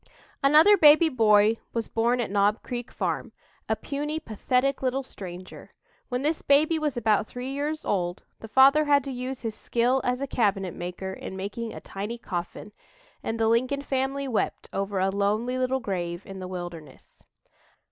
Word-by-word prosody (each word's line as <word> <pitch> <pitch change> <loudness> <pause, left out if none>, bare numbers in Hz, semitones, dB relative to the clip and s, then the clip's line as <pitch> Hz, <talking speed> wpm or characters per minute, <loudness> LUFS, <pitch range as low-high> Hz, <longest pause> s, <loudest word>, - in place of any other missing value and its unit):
Another 310 +9 +7
baby 310 0 +7
boy 220 -4 +4 0.2
was 230 -1 -2
born 235 +2 +1
at 235 - -2
Knob 205 +2 +2
Creek 245 -1 -5
farm; - - -3 0.4
a - - +2
puny, 295 +2 -4
pathetic 255 +1 0
little 265 +1 0
stranger. 185 -6 -10 0.3
When 250 +1 -2
this 310 +2 0
baby 310 +3 +3
was 300 -4 -2
about 220 -2 +2
three 250 +2 -6
years 295 +3 -3
old, 175 -3 -1 0.2
the 225 - -9
father 275 +6 +6
had 285 -2 +4
to 275 - -5
use 255 +1 -5
his 225 -2 -2
skill 245 +4 +1
as 250 0 0
a 275 - -2
cabinet 200 - 0
maker 180 +2 -5
in 190 - -7
making 210 +4 -5
a - - -8
tiny 210 +4 -6
coffin, 180 0 -6 0.5
and 225 0 -3
the 225 - +3
Lincoln 255 +5 +1
family 270 +1 -1
wept 235 -5 -2
over 195 0 -2
a 190 +1 +2
lonely 215 +6 0
little 255 +1 +1
grave 175 -5 -4
in 195 -1 -8
the 185 - -6
wilderness. 175 -4 -9
235 Hz, 170 wpm, -26 LUFS, 200-275 Hz, 0.5 s, Another